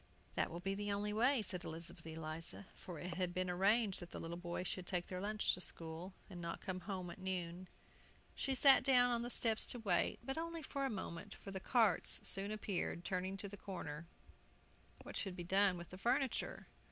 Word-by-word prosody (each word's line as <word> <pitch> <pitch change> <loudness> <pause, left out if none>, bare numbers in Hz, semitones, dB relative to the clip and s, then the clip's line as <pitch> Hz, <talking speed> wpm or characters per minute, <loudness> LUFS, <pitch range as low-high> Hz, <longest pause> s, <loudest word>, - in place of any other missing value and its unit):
"That - - +1
will 170 - -5
be 195 +1 -1
the 205 +1 -2
only 205 +1 -1
way," 240 +2 +3
said 180 -2 -2
Elizabeth 165 +1 -6
Eliza; 160 +4 -3
for 175 -3 -8
it 180 +3 -4
had 180 -2 0
been 185 0 0
arranged 200 +3 +3
that 175 - -8
the - - -6
little 165 +1 -4
boys 175 +1 -4
should 180 -1 -3
take 180 -2 0
their 185 -1 -5
lunch 210 +1 +2
to 180 - -3
school, 170 +3 -2
and 175 -3 -8
not 170 0 -4
come 185 -2 -4
home 185 -1 -4
at 175 - -10
noon. 185 -1 -3 0.7
She 270 - -1
sat 270 +1 +8
down 250 -2 +6
on 235 -1 +1
the 240 - -3
steps 225 -2 +3
to 245 - -2
wait, 190 -6 +2
but 270 +5 -2
only 335 -1 -4
for 275 0 -2
a - - 0
moment, 200 -2 -5
for 195 - -9
the 190 - -3
carts 225 +1 +4
soon 195 +1 +2
appeared, 200 -5 -2
turning 185 +1 -1
the 200 +1 -4
corner. 170 -5 -6 1.0
What - - -8
should 190 -3 -1
be 175 - -4
done 190 +1 +3
with 175 -1 -8
the 185 - -9
furniture? 240 +4 0
190 Hz, 205 wpm, -38 LUFS, 175-215 Hz, 1.0 s, sat